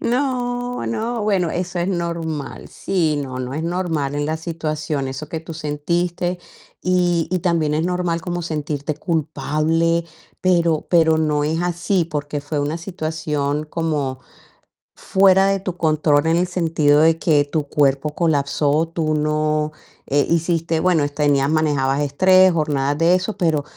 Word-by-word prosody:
No, 245 -1 -1
no, 230 0 -2
bueno, 195 -5 +1
eso 175 +1 -3
es 175 +2 0
normal. 170 -5 -4
Sí, 165 -6 -1
no, 130 -2 -6
no, 130 +1 -4
es 155 - -3
normal 165 -5 -2
en 145 0 -1
la 155 +1 -1
situación 155 -3 -3
eso 140 +3 -6
que 160 - -4
tú 165 0 -9
sentiste. 170 +4 -2 0.4
Y, 175 -2 +1
y 185 - +1
también 165 -4 0
es 160 +2 0
normal 180 -2 -1
como 175 0 -4
sentirte 150 -2 -3
culpable, 160 0 0 0.4
pero 170 -4 +2
pero 160 -2 +4
no 150 -2 +1
es 160 +3 -1
así, 175 +1 0
porque 150 -2 -4
fue 145 +1 -4
una 145 +3 -1
situación 155 -4 -3
como 150 -5 -2 0.8
fuera 195 0 +4
de 195 0 +1
tu 185 -2 -5
control 155 -2 +2
en 165 +1 +3
el 180 - +1
sentido 160 -4 +2
de 165 0 +4
que 150 -4 +3
tu 150 0 -2
cuerpo 140 +1 +1
colapsó, 150 -1 +1
tú 155 -2 0
no 150 0 0 0.4
eh, 145 +1 +2
hiciste 165 -1 0
bueno, 165 -5 +2
tenías 145 -1 +1
manejabas 145 -3 +1
estrés, 185 +6 +5
jornadas 145 -3 0
de 170 +3 +4
eso, 185 +2 -2
pero 160 -5 +1
160 Hz, 150 wpm, -20 LUFS, 150-175 Hz, 0.8 s, estrés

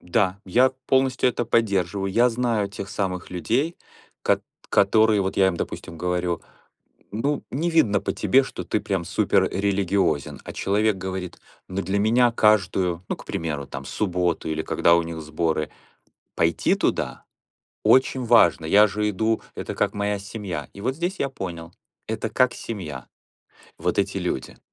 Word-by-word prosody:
Да, 95 +2 0
я 125 +8 +4 0.2
полностью 130 -1 +3
это 120 0 -1
поддерживаю. 100 -4 +1
Я 120 +3 +5
знаю 115 -4 0
тех 100 0 -7
самых 95 -4 -3
людей, 125 - -1 0.5
кот - - +2 0.3
которые 110 +1 +4
вот 95 0 -2
я 95 -1 +5
им, 85 - -2
допустим, 85 0 -6
говорю: 90 -1 -1 0.7
"Ну, 140 +7 -1
не 165 +6 -1
видно 110 -12 +3
по - - -2
тебе, 120 +7 +3
что - - -6
ты 110 - -1
прям 95 -4 -2
супер 100 0 +2
религиозен". 95 -6 0
А - - -7
человек 105 +1 +1
говорит: 95 -1 -5 0.3
"Ну, 95 +1 -3
для 100 +1 -1
меня 120 +3 +4
каждую 95 -5 +2
ну, - - -2
к - - -13
примеру, 75 -4 -3
там, 65 +1 -7
субботу 85 +4 -1
или 80 0 -1
когда 85 - +3
у 85 - +2
них 85 -1 -6
сборы, 80 0 -1 0.7
пойти 80 0 +2
туда - - -1 0.6
очень 130 -1 +4
важно. 85 - +4
Я 105 +6 +6
же 105 +1 -1
иду, 110 +2 0
это - - -5
как - - 0
моя 100 0 -1
семья". 100 -7 -6
И 100 - -10
вот 130 +3 0
здесь 175 +3 -2
я 140 - +1
понял. 85 -8 -7 0.4
Это - - -2
как 130 -1 +2
семья. 75 - -6 0.7
Вот - - -1
эти - - 0
люди. - - -4
100 Hz, 160 wpm, -24 LUFS, 90-110 Hz, 0.7 s, Я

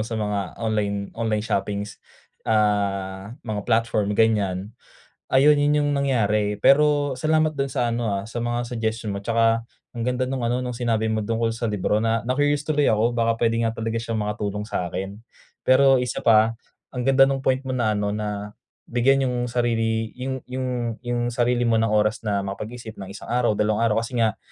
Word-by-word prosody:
sa 115 - -4
mga 105 -3 -2
online 105 -3 -2
online 110 -2 -1
shoppings, 100 0 -3 0.5
ah, 100 -1 0
mga 110 -3 -3
platform, 110 -3 +1
ganiyan. 105 -3 +1 0.6
Ayun 145 +3 +5
yun, 145 0 +2
yung - - +1
nangyari. 105 -7 +1
Pero 145 +3 +4
salamat 155 +2 +1
dun 135 -1 -2
sa 125 -3 0
ano 115 -1 -1
ah, 100 -1 -2
sa 115 +1 -5
mga 120 +1 -1
suggestion 110 -3 -3
mo 100 - -4
tsaka 115 +1 +2 0.3
ang 120 - -5
ganda 125 +2 0
nung 130 0 -3
ano, 120 +1 0
nung 125 - -3
sinabi 115 -2 0
mo 110 - 0
tungkol 115 +1 -1
sa 115 0 -2
libro. 105 +1 0
Na 115 0 0
na-curious 145 +3 +1
tuloy 150 -2 +2
ako 110 +2 +2
baka 115 -1 +1
puwede 115 0 +1
nga 115 - +2
talaga 115 0 -3
siyang 115 -1 -3
makatulong 105 -1 -3
sa'kin. 95 0 -4 0.4
Pero 135 0 +5
isa 125 - -3
pa 115 0 +4 0.3
ang 125 - -4
ganda 135 0 +6
nung 135 -1 -1
point 130 0 +2
mo - - -5
na 120 -4 +1
ano, 105 0 -1
na 105 -1 -4 0.4
bigyan 135 +3 +2
yung 125 -1 -1
sarili 115 -2 0
yung 130 +1 -5
yung 125 -2 -3
yung 120 -1 -2
sarili 120 0 +1
mo 115 - +2
ng 115 - +1
oras 105 +1 +1
na 100 -3 -1
makapag-isip 110 +3 -6
ng 95 - -7
isang 100 - -9
araw, 120 -3 +1
dalawang 105 +1 +1
araw 115 -2 +2
kasi 120 - -10
nga 115 -3 +1
115 Hz, 185 wpm, -23 LUFS, 105-125 Hz, 0.6 s, ganda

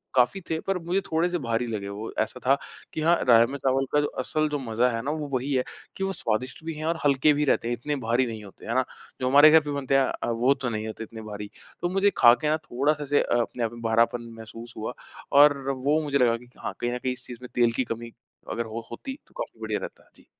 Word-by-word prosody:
काफ़ी 125 +10 +3
थे 160 0 0
पर 195 -1 +1
मुझे 175 +3 0
थोड़े-से 175 +1 0
भारी 115 -3 -1
लगे 105 -3 -4
वो। 105 +3 -6
ऐसा - - -1
था 135 +2 +5 0.4
कि 155 - -3
हाँ, 170 +2 +5
राजमा-चावल 130 +3 +4
का 150 - +5
जो 145 - 0
असल 155 +4 0
जो 145 -1 -2
मज़ा 120 0 +1
है 115 -1 -2
ना, 140 - -2
वो 150 -1 -3
वही 130 +3 -1
है 130 -1 +2 0.3
कि 195 - -3
वो 195 0 -1
स्वादिष्ट 125 +5 -2
भी 165 - -3
हैं 155 +1 -6
और 165 0 0
हल्के 140 +2 +4
भी 150 +1 +1
रहते 120 - +2
हैं। 120 - 0
इतने 145 +5 -3
भारी 120 +3 +2
नहीं 110 -2 -6
होते 100 - -13
है 115 +2 -2
ना? 130 - +4 0.4
जो 130 - +1
हमारे 145 +3 +8
घर 160 - +8
पे 145 -1 -5
बनते 140 -1 0
हैं 135 - +4
अ, - - -3
वो 120 +4 +3
तो 130 -2 -3
नहीं 110 0 -3
होते 110 +1 -6
इतने 110 0 -9
भारी। 105 -1 -7 0.3
तो 175 - 0
मुझे 195 +2 +3
खा 120 -1 +8
के 150 - +2
ना 155 - +2
थोड़ा-सा 145 +1 -1
ऐसे 145 +1 +2
अ, - - 0
अपने 120 0 -3
आप 115 - -1
में 120 - -10
भरापन 115 +1 +1
महसूस 115 +2 -9
हुआ 110 +3 -4 0.4
और 145 0 +7
वो 140 +3 +1
मुझे 140 -1 +1
लगा 120 -3 +3
कि 120 +1 -17
हाँ, - - -5
कहीं 120 0 -1
न 125 - -1
कहीं 125 0 -2
इस 125 0 -10
चीज़ 120 - -7
में 125 - -9
तेल 120 -1 +4
की 130 - +1
कमी 115 +1 -9 0.4
अगर 115 - -2
हो 115 +1 -6
होती 265 - -6
तो - - -26
काफ़ी - - -7
बढ़िया - - -2
रहता। - - -9
जी। - - -20
130 Hz, 260 wpm, -26 LUFS, 115-150 Hz, 0.4 s, हमारे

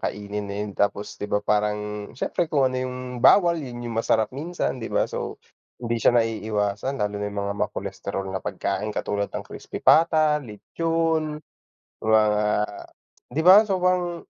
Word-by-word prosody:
kainin, 105 0 -4
ayan, 100 +1 -4
tapos, 100 +1 -2
di 105 - -4
ba, 105 0 0
parang 105 0 -1
siyempre, 170 +5 -1
kung 145 -3 +2
ano 130 - -3
'yung 130 0 -4 0.2
bawal 170 +3 +5
'yun 120 -4 -7
'yung 120 - -4
masarap 110 0 +1
minsan, 150 -1 -3
di 115 - -5
ba? - - +1
So, - - -5 0.4
hindi 120 -1 -3
siya 120 - +4
naiiwasan 110 +1 -1
lalo 105 0 -1
na 105 - -2
'yung 100 - -9
mga 100 0 -2
ma-cholesterol 95 - -3
na 95 - -3
pagkain 105 - -3
katulad 100 0 -2
ng - - -6
crispy - - -8
pata, 155 -2 +5
lechon, 160 +6 -1 0.6
mga 110 0 +4 1.1
di 160 - -1
ba? 190 +4 +9
So, 190 -2 0
parang 180 -2 +1
115 Hz, 160 wpm, -24 LUFS, 105-155 Hz, 1.1 s, ba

